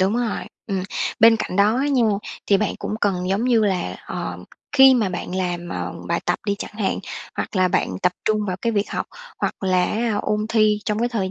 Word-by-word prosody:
đúng 195 Hz, +5 st, +2 dB
rồi, 240 Hz, -3 st, -1 dB, 0.2 s
ừm. 195 Hz, -3 st, -1 dB, 0.4 s
Bên 225 Hz, 0 st, +8 dB
cạnh 185 Hz, -, -4 dB
đó 210 Hz, +3 st, +4 dB
á 275 Hz, +3 st, +1 dB
nha, 265 Hz, -4 st, +3 dB, 0.4 s
thì 200 Hz, -, +5 dB
bạn 215 Hz, 0 st, -1 dB
cũng -, -, -3 dB
cần 185 Hz, -2 st, 0 dB
giống 200 Hz, +5 st, +1 dB
như 240 Hz, -3 st, +4 dB
là, 180 Hz, -, -1 dB
ờm, 90 Hz, 0 st, -5 dB, 0.3 s
khi 265 Hz, -2 st, +8 dB
mà 225 Hz, -6 st, +2 dB
bạn 180 Hz, 0 st, -5 dB
làm, 175 Hz, -2 st, -2 dB
ờ, -, -, -4 dB, 0.2 s
bài -, -, 0 dB
tập -, -, +1 dB
đi 200 Hz, -, +1 dB
chẳng -, -, -6 dB
hạn, 200 Hz, -, 0 dB, 0.4 s
hoặc -, -, -3 dB
là 185 Hz, 0 st, +4 dB
bạn -, -, +1 dB
tập 180 Hz, -, +3 dB
trung 215 Hz, 0 st, +2 dB
vào 180 Hz, -1 st, -2 dB
cái 230 Hz, -, +1 dB
việc 205 Hz, -1 st, 0 dB
học, -, -, -2 dB, 0.3 s
hoặc -, -, -1 dB
là 185 Hz, -2 st, +2 dB
á 220 Hz, 0 st, 0 dB
ôn 210 Hz, 0 st, 0 dB
thi 215 Hz, -2 st, +3 dB
trong 210 Hz, 0 st, -1 dB
cái 240 Hz, -, +1 dB
thời 200 Hz, -6 st, -2 dB
205 Hz, 230 wpm, -22 LUFS, 185-225 Hz, 0.4 s, Bên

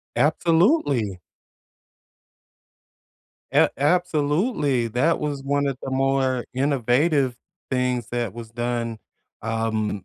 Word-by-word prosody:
Absolutely. 150 Hz, -, +2 dB, 2.3 s
A -, -, +5 dB
absolutely, 150 Hz, -, +1 dB
that 130 Hz, +9 st, +1 dB
was 145 Hz, -2 st, -3 dB
one 140 Hz, +1 st, 0 dB
of 135 Hz, -2 st, -1 dB
the 135 Hz, -, -4 dB
more 130 Hz, -1 st, +1 dB
innovative 135 Hz, 0 st, +1 dB, 0.3 s
things 125 Hz, -3 st, 0 dB
that 120 Hz, -4 st, -2 dB
was 115 Hz, -1 st, -9 dB
done, 120 Hz, -1 st, -3 dB, 0.4 s
um, 110 Hz, -3 st, -2 dB
130 Hz, 90 wpm, -23 LUFS, 120-145 Hz, 2.3 s, A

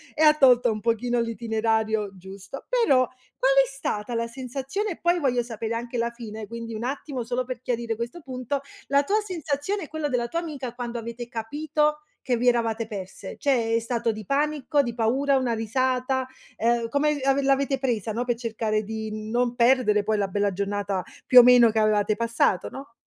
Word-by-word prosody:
e 315 Hz, -, +2 dB
ha 305 Hz, -, +8 dB
tolto 250 Hz, -5 st, +5 dB
un 215 Hz, -, -3 dB
pochino 235 Hz, +1 st, 0 dB
l'itinerario 220 Hz, -2 st, 0 dB
giusto. 195 Hz, +7 st, -10 dB
Però, 275 Hz, -, +3 dB, 0.3 s
qual 265 Hz, +1 st, +3 dB
è 265 Hz, -, -4 dB
stata 240 Hz, -4 st, -4 dB
la 230 Hz, -, 0 dB
sensazione 270 Hz, -, -4 dB
e, 335 Hz, -, -7 dB
poi, 345 Hz, +1 st, +2 dB
voglio 250 Hz, -5 st, +1 dB
sapere 230 Hz, -1 st, -4 dB
anche 240 Hz, +1 st, -4 dB
la 235 Hz, 0 st, +1 dB
fine, 220 Hz, -3 st, -8 dB
quindi, 230 Hz, +1 st, -6 dB
un 215 Hz, -, -5 dB
attimo 265 Hz, -1 st, -3 dB
solo 250 Hz, +2 st, -1 dB
per 250 Hz, -2 st, -6 dB
chiarire 235 Hz, -2 st, -2 dB
questo 240 Hz, +10 st, -5 dB
punto, 260 Hz, 0 st, -3 dB, 0.3 s
la 280 Hz, +1 st, +3 dB
tua 415 Hz, +8 st, +1 dB
sensazione 345 Hz, +1 st, -3 dB
e 310 Hz, -, -7 dB
quello 315 Hz, -2 st, -3 dB
della 240 Hz, -2 st, 0 dB
tua 335 Hz, -, -2 dB
amica, 280 Hz, -8 st, -5 dB
quando 240 Hz, -1 st, -5 dB
avete 235 Hz, +1 st, -6 dB
capito 300 Hz, +6 st, -1 dB, 0.2 s
che 245 Hz, -2 st, +1 dB
vi 245 Hz, -, 0 dB
eravate 230 Hz, -2 st, +1 dB
perse? 195 Hz, -2 st, -7 dB
Cioè, 235 Hz, -6 st, +1 dB
è 230 Hz, -, +3 dB
stato 230 Hz, -1 st, -1 dB
di 215 Hz, -1 st, -8 dB
panico, 290 Hz, +2 st, +1 dB
di 240 Hz, -3 st, -3 dB
paura, 265 Hz, +5 st, +2 dB
una 255 Hz, -3 st, +1 dB
risata, 255 Hz, +3 st, 0 dB, 0.3 s
uhm, 235 Hz, 0 st, +1 dB
come 290 Hz, +3 st, +1 dB
av 270 Hz, 0 st, +2 dB
l'avete 275 Hz, 0 st, +1 dB
presa, 230 Hz, -5 st, -1 dB
no, 240 Hz, +3 st, -1 dB
per 240 Hz, -1 st, 0 dB
cercare 220 Hz, -2 st, -1 dB
di 215 Hz, 0 st, -5 dB
non 245 Hz, +1 st, 0 dB
perdere 235 Hz, -4 st, +3 dB
poi 215 Hz, +1 st, 0 dB
la 200 Hz, -2 st, 0 dB
bella 205 Hz, 0 st, 0 dB
giornata, 200 Hz, 0 st, -2 dB, 0.2 s
più 255 Hz, -, +9 dB
o 245 Hz, -, +10 dB
meno, 245 Hz, -1 st, +7 dB
che 220 Hz, -, +1 dB
avevate 215 Hz, -1 st, +2 dB
passato, 230 Hz, -5 st, +1 dB
no? 270 Hz, -3 st, -10 dB
240 Hz, 190 wpm, -25 LUFS, 225-270 Hz, 0.3 s, o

